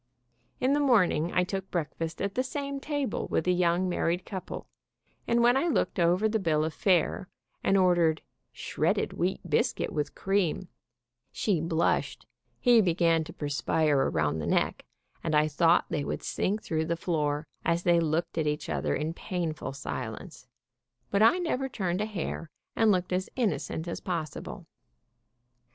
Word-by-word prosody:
In 260 +2 +2
the 290 - +2
morning 190 - +3
I 180 - +2
took 190 +1 -4
breakfast 165 0 -3
at 200 -1 -2
the 255 - +1
same 280 +1 -4
table 285 -4 -2
with - - 0
the 180 - +2
young 175 +1 +2
married 175 +1 0
couple, 190 -2 -6 0.6
and 235 0 +3
when 240 +1 +5
I 275 +6 +2
looked 300 - 0
over 175 +5 +3
the 220 0 0
bill 155 -5 +1
of 160 - -3
fare, 180 0 +1 0.3
and 195 - +3
ordered 175 -4 +3 0.3
"shredded - - -1
wheat 180 +2 -1
biscuit 150 - 0
with 150 -1 -2
cream," 190 -2 0 0.6
she 190 -7 0
blushed, 165 0 0 0.3
he 240 -3 +6
began 165 -3 +2
to - - -9
perspire 150 +1 0
around 75 0 0
the 75 - -3
neck, - - 0 0.4
and 160 -2 0
I 150 0 +4
thought 165 +3 +3
they 145 - -1
would - - -4
sink 210 +3 -1
through 160 -1 -1
the 170 +1 -1
floor, 150 -3 -1 0.2
as 170 +1 +1
they 175 -1 +4
looked 165 +1 -1
at 155 - 0
each 150 0 -2
other - - 0
in 155 +2 -2
painful 165 -6 -3
silence, 135 -1 -6 0.6
but 200 - +2
I 230 +11 +6
never 275 -7 -1
turned 185 -5 -2
a 210 - -1
hair, 175 -5 -4 0.3
and 225 -1 +4
looked 180 -1 0
as 185 +1 -1
innocent 200 -8 -1
as 170 - -4
possible. 165 -5 -5
175 Hz, 165 wpm, -28 LUFS, 160-200 Hz, 0.6 s, he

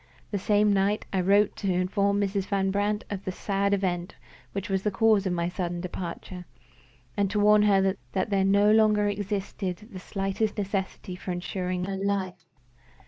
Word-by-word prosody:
The 200 - -1
same 205 +1 +3
night 200 +2 +1
I 190 - +2
wrote 200 +3 +3
to 195 - -1
inform 200 +3 +1
Mrs. 200 -1 0
Van 195 -1 +1
Brandt 205 +1 0
of 200 -1 -4
the 185 - -3
sad 200 +1 -1
event 180 -3 -1 0.4
which 195 0 -4
was 195 -1 0
the 210 - 0
cause 210 -1 +3
of 180 - 0
my 170 -1 0
sudden 175 -1 -3
departure, 180 0 -6 0.7
and 200 -1 +1
to 210 +1 -1
warn 210 0 +6
her 195 -2 +3 0.2
that 195 +2 -1
there 195 -1 +3
no 200 +2 +4
longer 215 -1 +4
existed 200 0 -3
the 185 - -7
slightest 195 +3 -2
necessity 195 -2 -3
for 185 - -6
insuring 180 0 -3
her 195 0 -3
life. 190 -4 -2
195 Hz, 175 wpm, -27 LUFS, 185-205 Hz, 0.7 s, warn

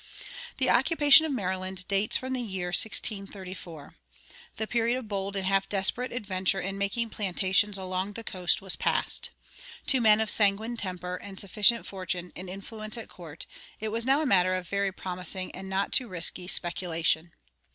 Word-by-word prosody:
The - - +1
occupation 310 -1 +6
of - - -3
Maryland 185 -5 -3
dates 200 +2 +1
from 260 0 -4
the 255 - -1
year 190 -6 -3
1634. 190 -5 -1 0.6
The 220 - -2
period 235 +2 +1
of 255 -4 -7
bold 200 -1 -3
and 195 -1 -1
half 195 0 +1
desperate 210 +6 0
adventure 195 -5 -1
in 195 +1 -3
making 220 +3 -1
plantations 195 +1 +1
along 185 +1 -3
the 230 - -7
coast 180 -3 +1
was 190 - +4
past. - - +1 0.6
To 260 -3 +3
men 215 -1 +6
of 220 -1 +2
sanguine 215 +3 +2
temper 180 -4 -4
and 195 0 -8
sufficient 210 +4 +3
fortune 180 -2 -4
and 185 0 -7
influence 215 +4 -6
at 230 - -8
court, 165 -3 -10 0.3
it 220 - -3
was 225 +2 -2
now 270 +5 +3
a - - -1
matter 185 -6 +3
of 185 -1 -4
very 200 0 0
promising 185 0 -4
and 190 +1 -8
not 190 +1 -1
too 255 - +2
risky 180 -1 -3
speculation. 170 -2 0
195 Hz, 170 wpm, -28 LUFS, 185-220 Hz, 0.6 s, occupation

